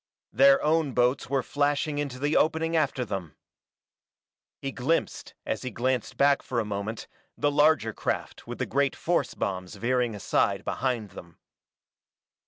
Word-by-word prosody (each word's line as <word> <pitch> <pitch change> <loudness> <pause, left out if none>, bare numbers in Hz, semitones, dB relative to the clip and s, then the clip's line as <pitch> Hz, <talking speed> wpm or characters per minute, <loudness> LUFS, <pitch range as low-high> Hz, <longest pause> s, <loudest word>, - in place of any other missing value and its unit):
Their 135 +4 +6
own 155 -3 +2
boats 125 +2 +1
were 135 -2 +1
flashing 145 +2 0
into 140 -4 -3
the 145 +3 0
opening 160 +1 +2
after 140 -5 +1
them. 95 -7 -5 1.2
He 135 - -4
glimpsed 145 +7 -2
as - - -2
he 130 - -4
glanced 125 +1 -2
back 140 0 +4
for 120 - -2
a 110 - -1
moment 105 +2 -4 0.3
the 145 0 +1
larger 145 -6 +3
craft - - -4
with - - -6
the - - -1
great 140 +1 0
force 175 +1 -1
bombs 95 0 -3
veering 120 +1 0
aside 100 - 0
behind 120 -6 -2
them. 85 -1 -12
130 Hz, 150 wpm, -27 LUFS, 115-145 Hz, 1.2 s, Their